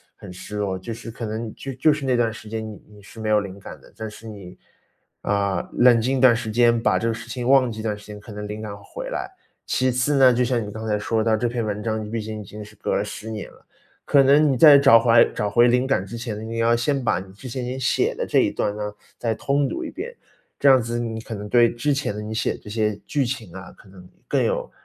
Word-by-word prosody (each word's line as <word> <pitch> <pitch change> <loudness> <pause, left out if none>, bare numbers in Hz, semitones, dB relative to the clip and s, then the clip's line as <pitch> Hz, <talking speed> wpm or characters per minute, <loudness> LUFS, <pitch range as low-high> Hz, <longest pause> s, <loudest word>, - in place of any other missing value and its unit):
很 - - -11
失 105 +3 -8
落， 100 -2 -1
就 105 +5 -6
是 115 +1 -9
可 115 +1 -6
能 110 +1 -4
就 135 - -6
就 150 +4 +3
是 145 -2 -5
那 130 -1 +2
段 115 -2 +2
时 110 -1 -11
间 110 0 -4
你 105 -2 -10
你 105 -1 -16
是 100 +3 -14
没 110 -1 -3
有 105 0 +4
灵 100 -2 -7
感 - - -10
的， - - -19
但 110 -1 -5
是 115 +2 -12
你， 100 -4 -10 0.7
啊， 100 -3 -1
冷 120 -1 +5
静 130 +4 0
一 - - -1
段 130 -3 +7
时 115 -1 -4
间， 120 +1 +4
把 115 - +2
这 115 - -1
个 115 - +1
事 115 - -9
情 125 -2 -4
忘 130 -3 +5
记 110 - -8
一 - - -5
段 105 -2 -2
时 105 - -15
间， 105 -1 -9
可 110 +2 -12
能 105 0 -6
灵 105 +1 -6
感 105 -2 -6
会 100 - -17 0.2
回 - - -5
来。 - - -3 0.4
其 130 0 +1
次 130 +4 +1
呢， 130 -2 +6
就 125 +1 +1
像 120 -3 0
你 105 - -7
刚 110 +1 -6
才 105 -1 +1
说 110 +1 -1
的， 110 -1 +2
这 120 +2 -1
篇 120 -1 -2
文 105 0 -3
章， 110 -1 -1
你 105 - -7
毕 115 0 -3
竟 110 0 -6
已 - - -10
经 105 +3 -9
是 105 +1 -14
隔 - - -2
了 100 - +1
10 105 +1 -7
年 110 -2 -6
了。 - - -22 0.4
可 140 -1 +5
能 145 +3 +5
你 135 - +2
在 145 +2 +9
找 140 -4 +7
回 115 +1 +2
来 115 0 +7
找 105 - -3
回 120 +4 +5
灵 125 +1 +2
感 135 -8 0
之 115 +4 -7
前， 110 -2 -5
你 115 0 -4
要 115 +1 +3
先 130 +3 0
把 110 - +1
你 95 0 -11
之 125 +6 -10
前 125 +1 -4
你 125 +1 -4
写 130 - +1
的 - - -3
这 - - +2
一 - - +2
段 105 - -1
呢， 105 -1 -4 0.2
再 115 -2 -1
通 140 +5 0
读 345 - -4
一 315 - -5
遍。 475 +6 -7 0.4
这 140 - +4
样 130 -1 +6
子 115 +1 -3
你 115 -2 -3
可 115 0 -7
能 105 0 -6
对 120 +1 +5
之 140 +6 -1
前 135 -6 -2
的 105 - -5
你 105 +1 -6
写 110 - 0
的 - - -11
这 - - -10
些 105 -1 0
剧 145 -3 0
情 120 -8 -5
啊， 95 0 -9
可 100 - -19
能 90 -1 -15 0.2
更 - - +1
有 - - -1
115 Hz, 310 characters per minute, -23 LUFS, 105-125 Hz, 0.7 s, 在